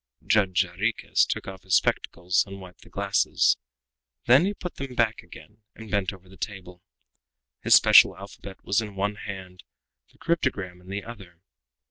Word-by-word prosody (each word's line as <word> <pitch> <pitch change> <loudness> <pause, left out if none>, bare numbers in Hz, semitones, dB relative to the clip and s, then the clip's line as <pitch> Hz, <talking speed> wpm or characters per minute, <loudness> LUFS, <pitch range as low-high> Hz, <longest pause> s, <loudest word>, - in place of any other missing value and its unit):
Judge 100 -3 +3
Jarriquez 100 +6 0
took - - -4
off 95 -1 -8
his 95 -1 +1
spectacles 90 +1 +1
and 100 0 -9
wiped 90 -1 -13
the - - -17
glasses; - - +1 0.7
then 130 +8 +6
he 200 - -1
put 180 -2 -7
them 135 -2 -6
back 115 -2 +1
again 105 +1 -15
and 110 -1 -11
bent 100 -3 0
over 95 -1 -15
the 95 +1 -16
table. 90 -3 -7 0.8
His - - +6
special - - +7
alphabet 100 0 -11
was 100 +3 +1
in 105 -3 -8
one 100 +2 -1
hand, 95 -3 -9 0.5
the - - -26
cryptogram 105 - -2
in 90 - -19
the 100 +1 -5
other. 95 -7 -12
100 Hz, 165 wpm, -25 LUFS, 95-110 Hz, 0.8 s, special